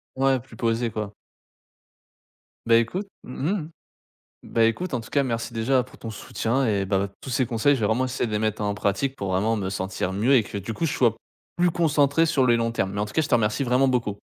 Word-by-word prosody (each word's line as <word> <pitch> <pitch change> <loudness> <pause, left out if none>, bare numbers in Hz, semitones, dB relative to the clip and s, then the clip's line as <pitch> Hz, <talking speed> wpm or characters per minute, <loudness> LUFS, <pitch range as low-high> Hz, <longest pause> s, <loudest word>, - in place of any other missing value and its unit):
Ouais. 135 0 +2
Plus 120 -1 -15
posé, 115 +1 0
quoi. 105 -1 -4 1.5
Beh 115 0 +6
écoute 185 - -4 0.2
mmh 130 +4 -3
mh 155 - -8 0.7
bah, 115 - +1
écoute, 130 +8 0
en 120 - -2
tout 110 - -13
cas, 140 - +3
merci 115 -3 -3
déjà 125 +3 +2
pour 125 - -17
ton 115 - -6
soutien 115 +4 -1
et 100 -4 +1
bah, 95 +1 0
tous - - -8
ces 130 +1 +1
conseils, 120 +4 +2
je 125 - -4
vais - - +2
vraiment 115 +5 +1
essayer 130 0 -1
de 110 - -5
les 105 - 0
mettre 110 -1 -1
en 105 0 0
pratique, 105 +7 -1
pour 100 -5 -3
vraiment 105 +5 +1
me 95 -3 -2
sentir 95 -1 -3
mieux 110 +8 +2
et 130 - +6
que, 100 -1 -7
du 100 +3 -5
coup, 165 - -1
je - - -2
sois 120 -4 +3 0.4
plus 175 0 +4
concentré 155 -2 +3
sur 140 -5 +2
les 120 -1 +4
longs 115 0 0
termes. 95 -4 -1
Mais, 100 +1 -2
en - - 0
tout 105 - -10
cas, - - +2
je 150 - -2
te 125 - +3
remercie 110 +4 +1
vraiment 130 +1 +3
beaucoup. 115 -6 -1
115 Hz, 245 wpm, -24 LUFS, 105-135 Hz, 1.5 s, Beh